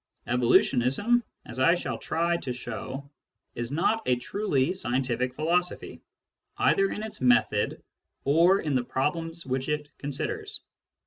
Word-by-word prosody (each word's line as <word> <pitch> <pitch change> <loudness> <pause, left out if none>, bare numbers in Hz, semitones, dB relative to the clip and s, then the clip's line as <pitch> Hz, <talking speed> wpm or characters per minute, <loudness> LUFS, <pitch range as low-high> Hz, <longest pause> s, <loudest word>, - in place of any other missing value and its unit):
Evolutionism, 125 - +3 0.2
as 125 - -7
I 165 +6 +5
shall 175 - -4
try 170 +1 0
to 135 - -5
show, 130 +3 -6 0.5
is 120 +1 -4
not 195 +9 +1
a 125 - +4
truly 145 +2 0
scientific 125 -5 -1
philosophy, 175 +4 -1 0.6
either 390 -1 +3
in 210 - -4
its 220 - -6
method 240 - +2 0.4
or 170 +7 +4
in 150 - -2
the 130 -2 +2
problems 165 +6 -2
which 130 +1 -2
it 150 -1 -2
considers. 405 - -4
150 Hz, 130 wpm, -27 LUFS, 130-180 Hz, 0.6 s, I